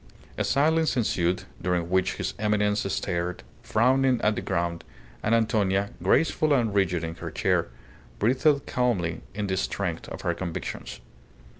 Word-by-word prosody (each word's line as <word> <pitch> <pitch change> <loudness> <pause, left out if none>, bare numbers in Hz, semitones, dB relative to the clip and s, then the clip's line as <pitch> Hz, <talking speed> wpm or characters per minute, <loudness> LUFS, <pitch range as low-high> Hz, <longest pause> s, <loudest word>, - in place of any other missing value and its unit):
A - - -1
silence 160 +1 +2
ensued, 90 -6 +1 0.2
during 90 -2 0
which 95 +1 +1
his - - -3
Eminence 105 -1 +1
stared, 85 -1 -2 0.2
frowning 130 +2 +3
at 105 - +4
the - - -3
ground, 85 0 -2 0.4
and 110 +2 +2
Antonia, 100 -3 +1
graceful 155 -2 +3
and 115 -6 +2
rigid 90 -4 +1
in 80 0 -3
her - - -5
chair, - - +1 0.5
breathed 135 +6 +2
calmly 110 -10 0
in 105 0 -2
the 95 -1 -1
strength 90 -3 -2
of - - -7
her 85 - 0
convictions. 85 -7 -5
100 Hz, 145 wpm, -26 LUFS, 90-120 Hz, 0.5 s, at